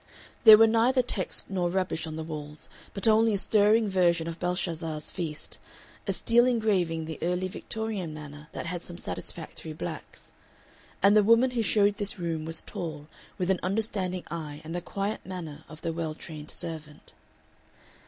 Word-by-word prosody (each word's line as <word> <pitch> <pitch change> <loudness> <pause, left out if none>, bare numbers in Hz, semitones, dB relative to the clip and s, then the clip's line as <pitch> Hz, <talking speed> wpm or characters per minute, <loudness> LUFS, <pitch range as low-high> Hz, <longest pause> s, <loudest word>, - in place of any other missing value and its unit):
There 215 -1 +12
were 225 - +8
neither 235 +3 +3
texts 195 -6 -2
nor 180 -3 0
rubbish 180 -3 -1
on 155 - -5
the 160 - -4
walls, 150 -1 -7 0.3
but 200 +3 0
only 220 0 +5
a - - +1
stirring 215 +2 +4
version 175 -4 +2
of 165 0 -5
Belshazzar's 165 -4 -2
feast, 160 -5 -5 0.5
a - - +2
steel 240 +1 +4
engraving 200 -9 +1
in - - -5
the 160 0 -6
early 180 +2 0
Victorian 210 -2 -4
manner 150 -1 -9
that - - -5
had 175 0 -4
some 175 - -8
satisfactory 160 -3 -5
blacks. 155 - -7 0.7
And 200 +1 +7
the 215 - +8
woman 230 +4 +5
who 240 -2 0
showed 205 -1 +3
this 205 0 0
room 165 -3 -2
was 165 0 -3
tall, 155 -3 -6 0.3
with 185 +1 +1
an 185 - +1
understanding 185 -2 -1
eye 155 -3 -5
and 160 +1 -6
the 175 - -2
quiet 200 +4 -3
manner 160 -5 -7
of 155 0 -12
the 165 -1 -1
well 160 -2 -3
trained 155 -2 -9
servant. 155 -3 -7
180 Hz, 175 wpm, -28 LUFS, 160-205 Hz, 0.7 s, There